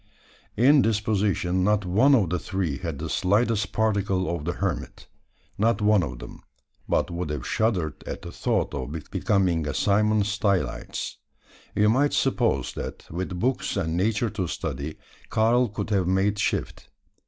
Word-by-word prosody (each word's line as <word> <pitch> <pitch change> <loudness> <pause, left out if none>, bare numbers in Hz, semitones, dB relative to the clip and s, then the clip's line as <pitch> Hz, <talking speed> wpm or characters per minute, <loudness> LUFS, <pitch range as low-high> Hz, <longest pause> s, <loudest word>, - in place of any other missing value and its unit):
In 135 +5 +6
disposition 105 -4 +1
not 105 0 +2
one 115 +11 +5
of 95 -10 +1
the 90 - 0
three 90 -8 -2
had 80 -5 -4
the 80 +3 -4
slightest 105 +5 +1
particle 100 -5 0
of 75 -3 -6
the 85 - -1
hermit. 95 -5 -4 0.5
Not 115 +2 +2
one 105 -1 +4
of 60 -7 -4
them, - - -10 0.5
but - - +1
would 85 -2 -3
have 75 -4 -4
shuddered 105 -9 0
at - - -5
the - - -7
thought - - -1
of 70 0 -4 0.2
becoming 95 -6 +1
a 70 - -3
Simon 105 +6 +3
Stylites. 100 - -1 0.6
You 105 - +4
might 140 +6 +2
suppose 115 - +1
that, - - -7
with 90 +1 -4
books 125 -1 0
and 80 -4 -1
Nature 105 +4 +1
to 95 -5 -2
study, 75 -1 -4 0.3
Karl 120 +2 +3
could 105 +1 -5
have 95 -4 +2
made 95 +2 +1
shift. - - -2
100 Hz, 155 wpm, -25 LUFS, 85-110 Hz, 0.6 s, In